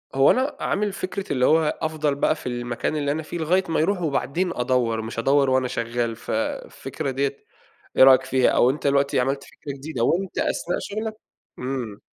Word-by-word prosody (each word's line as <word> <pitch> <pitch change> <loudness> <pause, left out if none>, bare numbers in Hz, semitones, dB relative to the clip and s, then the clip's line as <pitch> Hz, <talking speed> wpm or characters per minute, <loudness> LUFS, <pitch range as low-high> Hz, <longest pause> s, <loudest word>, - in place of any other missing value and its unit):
هو 135 +1 +6
أنا 265 +3 0
عامِل 205 -1 -1
فكْرة 190 -2 -4
اللي 125 -1 +2
هو 160 -1 +3
أفضل 155 -2 0
بقى 155 - +2
في - - -13
المكان 120 +3 -2
اللي 145 -1 0
أنا 160 +1 -2
فيه 170 - -6
لغاية 180 +4 +2
ما 160 - +1
يروح 180 +3 +1
وبعدين 165 +4 -1
أدوّر، 120 -3 +1
مش 115 +1 -5
أدوّر 135 +2 +3
وأنا 130 -1 +2
شغّال، 115 -1 -2
ف - - -8 0.4
فكرة 135 - -5
ديَّة 140 +1 -1 0.6
إيه - - +8
رأيك 130 0 +7
فيها؟ 130 -1 +3
أو 125 - +4
أنتَ 145 +1 -1
دلوقتي 140 -1 +2
عملت 135 +2 0
فكرة 140 - -9
جديدة، 135 -4 -3
وأنتَ 185 +7 0
أثناء 175 - -1
شغلَك 215 +1 -4 0.5
إمم. 125 -5 -4
140 Hz, 190 wpm, -23 LUFS, 125-160 Hz, 0.6 s, إيه